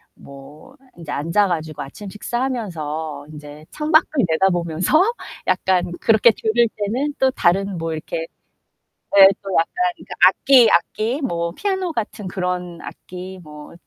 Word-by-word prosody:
뭐 140 - -14 0.2
인제 165 -4 -9
앉아 170 +8 +1
가지고 155 -4 -4
아침 170 +9 -9
식사하면서 175 - -4
인제 150 0 -11
창밖을 310 +1 +2 0.2
내다보면서 175 - +2 0.5
약간 185 -1 +1
그렇게 225 0 +5
들을 230 +1 +2
때는 250 +8 -2
또 265 0 +2
다른 195 -2 +1
뭐 165 0 -3
이렇게 160 +1 -5 1.0
예 195 -1 +11
또 195 - -8
약간 165 - +1 0.2
그 - - -14 0.2
악기, 260 -4 +5
악기, 220 - 0
뭐 170 -9 -2
피아노 380 - -2
같은 215 -3 -4
그런 180 -2 -4
악기 185 +1 -9
뭐 150 -1 -12
185 Hz, 265 characters per minute, -20 LUFS, 160-225 Hz, 1.0 s, 예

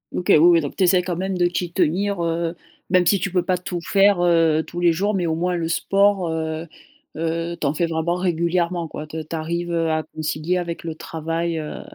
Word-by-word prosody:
OK 180 - -3
oui, - - +8
oui, 170 +1 +6
donc 145 - -5
tu 185 - +3
essaies 180 0 +4
quand 175 -2 -3
même 190 0 -2
de 175 0 +3
t'y 175 0 -3
tenir, 195 +3 +1
heu, 165 0 -1 0.3
même 180 -1 +4
si 195 +2 +3
tu 195 - -2
peux 180 -1 +1
pas 180 +1 0
tout 175 -1 -5
faire, 195 +1 +3
heu, 165 -2 +3
tous 175 - -7
les 175 -1 +4
jours, 200 +5 0
mais 185 -3 0
au 160 - 0
moins 180 +2 -1
le 165 -1 -2
sport, 195 +1 +2
heu 160 0 -3 0.5
heu, 165 +1 -2
tu - - -2
en 140 - +1
fais 170 +2 0
vraiment 165 +2 -1
régulièrement 175 -1 0
quoi. 150 0 -7
Tu 155 +1 -6
tu 165 - -4
arrives, 170 +2 -3
heu, 165 -1 0
à 155 0 0
concilier 155 +3 -2
avec 170 -1 -5
le 160 - -4
travail, 165 +1 -3
heu 155 -1 -6
170 Hz, 230 wpm, -22 LUFS, 160-180 Hz, 0.5 s, oui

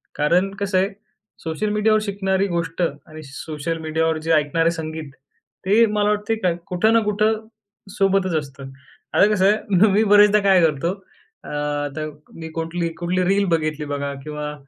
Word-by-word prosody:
कारण 175 +6 +2
कसं 195 -2 0
आहे, 190 +2 +2 0.5
सोशल 165 +6 -2
मीडियावर 215 +1 +3
शिकणारी 195 -1 -1
गोष्ट 170 -1 -3
आणि 155 0 -4
सोशल 155 +3 -5
मीडियावर 160 0 0
जे - - +2
ऐकणारे 160 +2 +2
संगीत 160 -3 -6 0.5
ते 220 +4 +5
मला 210 -1 0
वाटते 210 +2 0
का, 185 -5 0 0.2
कुठं 215 +5 +2
ना 230 - +5
कुठं 215 +1 0 0.5
सोबतच 195 -3 +2
असतं. 140 -2 -5 0.4
आता - - +5
कसं 190 -2 +2
आहे 205 -1 +3
मी 210 +3 +3
बरेचदा 205 0 +6
काय 195 -3 +4
करतो 155 +3 0 0.5
अ, - - -8
आता 145 0 -3 0.4
मी 160 - -6
कुठली 165 +1 -2
कुठली 180 +1 0
रील 195 +2 +2
बघितली 155 -2 -1
बघा 140 -1 -3
किंवा 150 0 -5
175 Hz, 155 wpm, -21 LUFS, 155-200 Hz, 0.5 s, बरेचदा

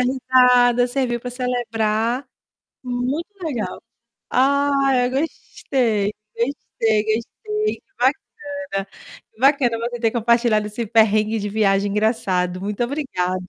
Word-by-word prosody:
risada, 250 -1 +4
serviu 245 -2 -1
para 250 +1 -6
celebrar. 240 -1 -1 0.6
Muito 255 +7 -2
legal. 265 -9 -4 0.5
Ah, 275 +1 +2
eu 245 - 0
gostei, 245 -7 -1 0.2
gostei, 225 -4 0
gostei, 425 - -2
bacana. 250 -1 0 1.1
Bacana 260 -3 +3
você 240 +1 -4
ter 225 -1 +2
compartilhado 235 -2 +2
esse 225 +2 -4
perrengue 215 0 +3
de 205 - -3
viagem 200 -1 +1
engraçado. 190 -4 0
Muito 205 +3 -3
obrigada. 185 -10 -2
240 Hz, 100 wpm, -21 LUFS, 215-260 Hz, 1.1 s, risada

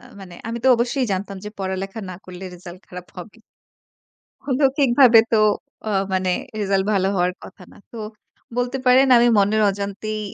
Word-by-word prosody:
আ - - -21 0.2
মানে 180 -2 -11
আমি 235 - -4
তো - - +5
অবশ্যই 245 +2 -1
জানতাম। 195 +1 -4
যে 210 - -5
পড়ালেখা 195 +2 -4
না 185 - -7
করলে 185 0 -10
রেজাল্ট 175 0 -11
খারাপ 180 0 -9
হবে 190 +5 -10 1.1
অলৌখিকভাবে 265 -3 +5
তো - - +5 0.5
আ - - -1 0.2
মানে 185 0 0 0.3
রেজাল্ট 195 -1 +1
ভালো 190 -1 +1
হওয়ার 180 0 +1
কথা 190 - -13
না। - - -17
তো 235 - -10 0.6
বলতে 245 +2 -1
পারেন 255 +2 +6
আমি 240 0 +5
মনের 210 +2 +2
অজান্তেই 200 +2 -5
205 Hz, 165 wpm, -21 LUFS, 190-240 Hz, 1.1 s, পারেন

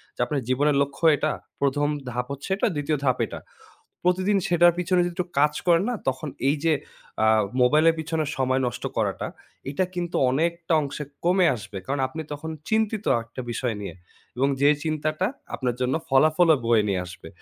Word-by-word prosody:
যে - - -28
আপনার 140 +2 -2
জীবনের 145 +3 +2
লক্ষ্য 140 +3 -2
এটা, 155 +1 0 0.3
১ম 145 +1 +2 0.2
ধাপ 125 0 -2
হচ্ছে 140 +5 -6
এটা, 200 - +1
২য় 145 +1 0
ধাপ 130 -2 +2
এটা। - - -7 0.7
প্রতিদিন 185 +3 +2
সেটার 175 0 +5
পিছনে 180 +1 +2
যদি 175 - -3
একটু 180 +1 -2
কাজ 150 +1 +4
করেন 170 +1 +4
না - - -1
তখন 130 +3 -2 0.2
এই 145 - +2
যে 165 - +4 0.5
আ - - +4 0.4
মোবাইলের 155 +6 +5
পিছনে 160 0 -1
সময় 130 0 +1
নষ্ট 120 - -5
করাটা, - - -1 0.4
এইটা 145 +7 0
কিন্তু 175 -1 -3
অনেকটা 170 +5 -1
অংশে 145 +1 -5 0.2
কমে 180 +1 +4
আসবে। 100 -2 -8
কারণ 140 +1 -1
আপনি 160 +5 -6
তখন 145 +2 -6 0.2
চিন্তিত 220 -1 0 0.2
একটা 115 +3 -9
বিষয় 120 -1 -2
নিয়ে 100 - -6 0.4
এবং 135 +2 +2
যে 145 - +6 0.2
চিন্তাটা 155 +2 -1 0.3
আপনার 125 -3 -1
জন্য 125 +1 +1
ফলাফলও 155 +4 +5
বয়ে 110 -3 +3
নিয়ে 95 -2 0
আসবে। 90 - -11
150 Hz, 175 wpm, -25 LUFS, 130-170 Hz, 0.7 s, যে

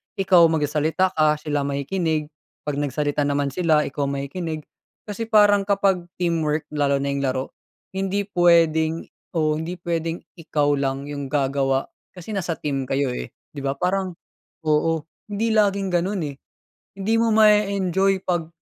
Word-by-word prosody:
ikaw 185 -3 +5
magsasalita 160 +3 +1
ka, 155 -3 +3
sila 150 -1 -2
makikinig, 155 +2 -1 0.3
'pag 145 -1 -2
nagsalita 145 +1 0
naman 140 -1 0
sila, 160 -2 +2
ikaw 140 0 -2
makikinig. 155 +3 -4 0.4
Kasi 220 +2 -5
parang 205 -2 +5
kapag 195 -3 +1
teamwork, 160 -3 0
lalo 140 -2 +1
na 140 - -1
'yong 140 - -1
laro, 130 -1 -2 0.4
hindi 195 +1 -1
puwedeng 165 -4 +3 0.3
oo, 155 -1 +1
hindi 165 +3 -4
puwedeng 170 -1 -3 0.2
ikaw 150 -2 +1
lang 135 -1 -1
'yong 145 -1 -5
gagawa, 135 -1 +1 0.3
kasi 180 +4 -8
nasa 180 -5 -2
team 135 -4 -3
kayo 135 -1 0
eh, 125 - -4 0.2
'di 145 - -8
ba, 135 0 0
parang 185 +1 -1 0.5
oo, 160 +1 +1 0.3
hindi 210 +3 0
laging 200 -2 +2
gano'n 185 +3 0
eh. 140 - -7 0.6
Hindi 195 +3 -1
mo 230 -1 +2
ma-e-enjoy 195 -3 +3
'pag 175 -3 -1
160 Hz, 145 wpm, -23 LUFS, 145-190 Hz, 0.6 s, ikaw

